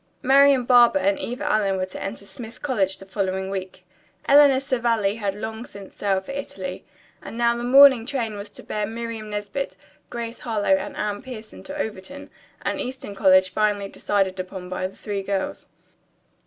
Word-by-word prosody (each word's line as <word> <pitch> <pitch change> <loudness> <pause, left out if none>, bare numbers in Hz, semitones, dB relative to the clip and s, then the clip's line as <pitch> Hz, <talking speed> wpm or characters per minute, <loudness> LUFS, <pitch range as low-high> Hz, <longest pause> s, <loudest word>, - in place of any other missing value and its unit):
Marian 275 0 +6
Barber 240 -3 +6
and 195 +1 +1
Eva 245 +2 -4
Allen 200 -3 +1
were 185 - -1
to 185 - -9
enter 200 0 -6
Smith 230 +4 -10
College 200 -9 0
the 195 - -12
following 190 -1 -2
week, 185 -1 -6 0.4
Eleanor 280 -2 +7
Savelli 235 -6 0
had 200 -3 -2
long 220 +2 -5
since 200 -5 -12
sailed 195 -2 -1
for - - -6
Italy, 190 -10 -6 0.4
and 230 - -8
now 235 0 +3
the 235 - -4
morning 260 -2 +7
train 235 -6 -2
was 205 +1 -7
to - - -13
bear 210 -1 -2
Miriam 225 -1 -5
Nesbit, 205 +6 -4 0.3
Grace 235 0 -5
Harlowe 210 -4 +1
and 190 - -5
Anne 205 -1 -2
Pierson 230 -4 -9
to 285 +1 -8
Overton, 220 +3 -6 0.3
an - - -2
eastern 255 -5 -5
college 185 -2 +4
finally 205 -1 0
decided 195 -2 -1
upon 185 0 -6
by 185 0 -2
the 190 - -16
three 205 -2 -4
girls. 195 0 -3
210 Hz, 175 wpm, -23 LUFS, 195-240 Hz, 0.4 s, Eleanor